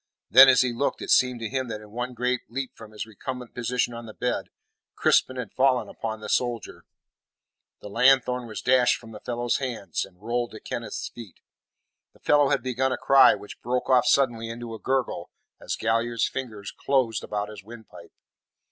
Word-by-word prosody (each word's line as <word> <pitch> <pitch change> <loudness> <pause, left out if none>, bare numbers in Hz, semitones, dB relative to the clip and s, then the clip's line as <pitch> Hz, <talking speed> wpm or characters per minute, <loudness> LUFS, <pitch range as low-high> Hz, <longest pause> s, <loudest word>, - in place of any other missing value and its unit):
Then, 130 +5 +10
as 130 -2 +6
he 125 -2 0
looked, 140 +4 -2
it - - -3
seemed 125 -2 +3
to 115 - -2
him 130 +2 -2
that 110 -2 -5
in 105 -1 -14
one 120 +2 -4
great 125 +1 0
leap 130 +1 -5
from 110 -1 -12
his 110 +1 -6
recumbent 125 +3 -7
position 120 0 -1
on 115 0 -8
the 110 - -11
bed, 125 - -2 0.5
Crispin 130 - +3
had 125 -6 -6
fallen 130 -1 +2
upon 110 -1 -5
the 110 - -7
soldier. 120 -3 -2 1.0
The - - -8
lanthorn 125 +2 +3
was 110 - -7
dashed 125 -1 +4
from 115 -1 -13
the 105 - -9
fellow's 120 +1 -1
hand, 115 - -5
and 90 -2 -14
rolled 120 +3 -2
to 110 - -8
Kenneth's 115 -1 -5
feet. 115 -6 -12 0.7
The - - -23
fellow 145 -2 +3
had 140 - +1
begun' 130 +1 0
a - - -1
cry, 135 0 +6
which 105 - -11
broke 125 +2 -1
off 125 -1 +4
suddenly 120 -5 +2
into 115 0 -7
a 110 - -7
gurgle 130 -8 -2 0.3
as - - -3
Galliard's 115 +1 0
fingers 110 -6 -6
closed 130 -6 0
about 105 0 -3
his 105 -2 -10
windpipe. 110 +1 -13
120 Hz, 190 wpm, -25 LUFS, 110-130 Hz, 1.0 s, Then